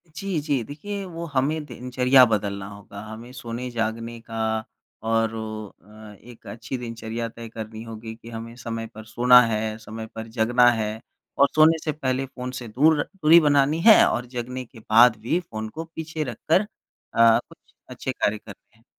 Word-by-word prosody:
जी, 190 Hz, -1 st, -2 dB
जी। 145 Hz, -5 st, 0 dB
देखिए, 200 Hz, -, -6 dB
वो 170 Hz, -2 st, -6 dB
हमें 145 Hz, +4 st, +1 dB
दिनचर्या 125 Hz, 0 st, +3 dB
बदलना 100 Hz, -3 st, -2 dB
होगा। 100 Hz, 0 st, -11 dB
हमें 110 Hz, +3 st, -9 dB
सोने-जागने 115 Hz, -1 st, -4 dB
का 115 Hz, 0 st, -7 dB, 0.7 s
और 115 Hz, 0 st, +2 dB, 0.5 s
अ, 105 Hz, +1 st, -13 dB
एक 120 Hz, 0 st, -15 dB
अच्छी 115 Hz, +3 st, -6 dB
दिनचर्या 115 Hz, -1 st, -5 dB
तय 115 Hz, 0 st, -10 dB
करनी 110 Hz, 0 st, -7 dB
होगी 115 Hz, 0 st, -8 dB
कि 115 Hz, 0 st, -13 dB
हमें 115 Hz, 0 st, -8 dB
समय 115 Hz, -2 st, -5 dB
पर 110 Hz, 0 st, -9 dB
सोना 125 Hz, +3 st, +6 dB
है, 110 Hz, -2 st, -1 dB
समय 110 Hz, 0 st, -8 dB
पर 110 Hz, 0 st, -6 dB
जगना 120 Hz, +2 st, +5 dB
है। 110 Hz, -1 st, -2 dB, 0.4 s
और 140 Hz, -, +8 dB
सोने 155 Hz, +1 st, +6 dB
से 155 Hz, -, 0 dB
पहले 135 Hz, -3 st, -2 dB
फ़ोन 125 Hz, -1 st, -7 dB
से 120 Hz, -, -7 dB
दूर 145 Hz, +7 st, +3 dB
दूरी 170 Hz, -4 st, +5 dB
बनानी 145 Hz, 0 st, +3 dB
है 220 Hz, -, +9 dB
और 120 Hz, -, -1 dB
जगने 125 Hz, +1 st, -4 dB
के 115 Hz, -1 st, -16 dB
बाद 115 Hz, +2 st, +5 dB
भी 155 Hz, +10 st, 0 dB
फ़ोन 110 Hz, -10 st, -6 dB
को 160 Hz, +8 st, -7 dB
पीछे 160 Hz, -1 st, -4 dB
रखकर 150 Hz, -, +1 dB, 0.5 s
अ, 115 Hz, 0 st, +6 dB
कुछ -, -, -21 dB, 0.2 s
अच्छे -, -, -4 dB
कार्य 105 Hz, +1 st, 0 dB
करने 105 Hz, 0 st, -15 dB
हैं। 115 Hz, -, -28 dB
115 Hz, 170 wpm, -24 LUFS, 110-135 Hz, 0.7 s, है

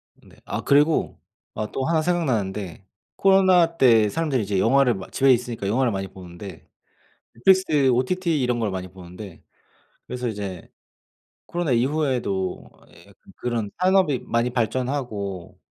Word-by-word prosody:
네. -, -, -21 dB
아 -, -, -4 dB
그리고 145 Hz, +3 st, +2 dB, 0.4 s
아 110 Hz, -, -3 dB
또 130 Hz, -, -2 dB
1 165 Hz, -1 st, +2 dB
생각나는데 105 Hz, -, -2 dB, 0.3 s
코로나 185 Hz, -3 st, +4 dB
때 115 Hz, -6 st, +5 dB
사람들이 140 Hz, -2 st, -1 dB
이제 100 Hz, -1 st, -1 dB
영화를 130 Hz, +3 st, +4 dB
막 95 Hz, -3 st, -9 dB
집에 135 Hz, 0 st, +4 dB
있으니까 120 Hz, -4 st, -1 dB
영화를 125 Hz, +3 st, +1 dB
많이 95 Hz, -1 st, -3 dB
보는데 90 Hz, 0 st, -11 dB, 0.7 s
Netflix 155 Hz, -2 st, +3 dB
OTT 160 Hz, +5 st, 0 dB
이런 125 Hz, -1 st, 0 dB
걸 110 Hz, -3 st, -1 dB
많이 95 Hz, -1 st, -5 dB
보는데 90 Hz, 0 st, -11 dB, 0.7 s
그래서 125 Hz, 0 st, -4 dB
이제 100 Hz, -5 st, -6 dB, 0.8 s
코로나 175 Hz, -3 st, -2 dB
이후에도 125 Hz, -8 st, -1 dB, 0.2 s
예 -, -, -18 dB
약간 -, -, -20 dB
그런 115 Hz, -4 st, -3 dB
산업이 185 Hz, -7 st, +3 dB
많이 115 Hz, +1 st, 0 dB
발전하고 120 Hz, -, -3 dB
125 Hz, 320 characters per minute, -23 LUFS, 100-150 Hz, 0.8 s, 때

